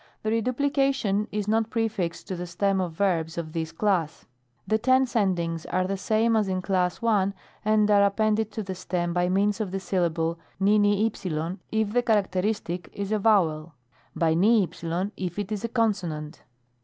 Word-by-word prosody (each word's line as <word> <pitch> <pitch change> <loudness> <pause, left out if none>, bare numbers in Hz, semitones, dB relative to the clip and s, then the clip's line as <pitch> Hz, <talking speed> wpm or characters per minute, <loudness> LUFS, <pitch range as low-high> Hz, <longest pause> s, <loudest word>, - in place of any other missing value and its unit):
The 215 - 0
reduplication 255 -3 +1
is 210 -1 -2
not 220 +1 +1
prefixed 220 -7 -2
to 190 - -3
the 175 0 -5
stem 190 +2 0
of 175 -3 -3
verbs 165 -3 0
of 155 -2 -5
this 160 -1 -3
class. 165 -3 -1 0.4
The 220 - +1
tense 260 +1 +2
endings 170 -6 0
are 185 0 0
the 195 +1 -1
same 220 +3 +1
as 215 -2 +2
in 185 -1 -2
Class 180 -1 0
I., 200 -4 +2 0.3
and 215 0 +3
are 205 -1 +6
appended 215 +2 +2
to 220 - -3
the 190 -1 -5
stem 175 -1 -2
by 175 0 +1
means 205 +3 +1
of 210 - -2
the 195 +1 -3
syllable 170 -3 -1 0.2
vvv^ 200 -4 +1
if 220 -1 0
the 245 - +3
characteristic 195 -4 -1
is 200 0 -4
a 215 - +1
vowel; 165 -7 +2 0.4
by 160 -1 +2
vv 200 +2 +4 0.5
if 180 -1 -4
it 205 0 -3
is 210 -1 -3
a 230 - -2
consonant. 180 -10 -1
195 Hz, 170 wpm, -26 LUFS, 175-215 Hz, 0.5 s, are